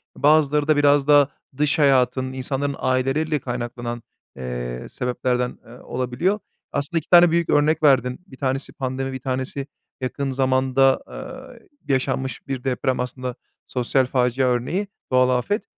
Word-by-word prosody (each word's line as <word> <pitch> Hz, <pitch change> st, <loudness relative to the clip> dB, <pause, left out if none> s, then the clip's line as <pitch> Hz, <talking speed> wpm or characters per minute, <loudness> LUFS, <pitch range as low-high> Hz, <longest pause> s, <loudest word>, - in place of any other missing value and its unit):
bazıları 150 Hz, 0 st, +3 dB
da 155 Hz, -1 st, +4 dB
biraz 145 Hz, -1 st, +4 dB
daha 145 Hz, -2 st, +6 dB, 0.3 s
dış 150 Hz, +2 st, +2 dB
hayatın, 130 Hz, -2 st, +3 dB
insanların 135 Hz, +2 st, -2 dB
aileleriyle 135 Hz, +4 st, 0 dB
kaynaklanan, 120 Hz, -1 st, -5 dB, 0.3 s
eee, 60 Hz, -1 st, -5 dB
sebeplerden, 125 Hz, 0 st, -1 dB
eee, 115 Hz, -, -15 dB
olabiliyor. 130 Hz, +11 st, -1 dB, 0.3 s
Aslında 145 Hz, +4 st, -1 dB
2 155 Hz, -, -16 dB
tane 175 Hz, -1 st, +7 dB
büyük 170 Hz, 0 st, +1 dB
örnek 155 Hz, +2 st, +3 dB
verdin. 125 Hz, -3 st, +3 dB
1 130 Hz, -, -14 dB
tanesi 135 Hz, 0 st, -2 dB
pandemi, 135 Hz, -1 st, -3 dB
1 130 Hz, -, -5 dB
tanesi 130 Hz, +2 st, -3 dB, 0.3 s
yakın 135 Hz, +2 st, -2 dB
zamanda, 130 Hz, 0 st, +2 dB
eee, 260 Hz, -2 st, -10 dB, 0.2 s
yaşanmış 130 Hz, -2 st, -1 dB
bir 135 Hz, -2 st, -4 dB
deprem, 130 Hz, -1 st, -1 dB
aslında 125 Hz, 0 st, -4 dB, 0.3 s
sosyal 130 Hz, +1 st, +1 dB
facia 125 Hz, 0 st, +1 dB
örneği, 130 Hz, -, 0 dB, 0.2 s
doğal 130 Hz, 0 st, +4 dB
afet. 205 Hz, -, -2 dB
130 Hz, 135 wpm, -22 LUFS, 125-145 Hz, 0.3 s, tane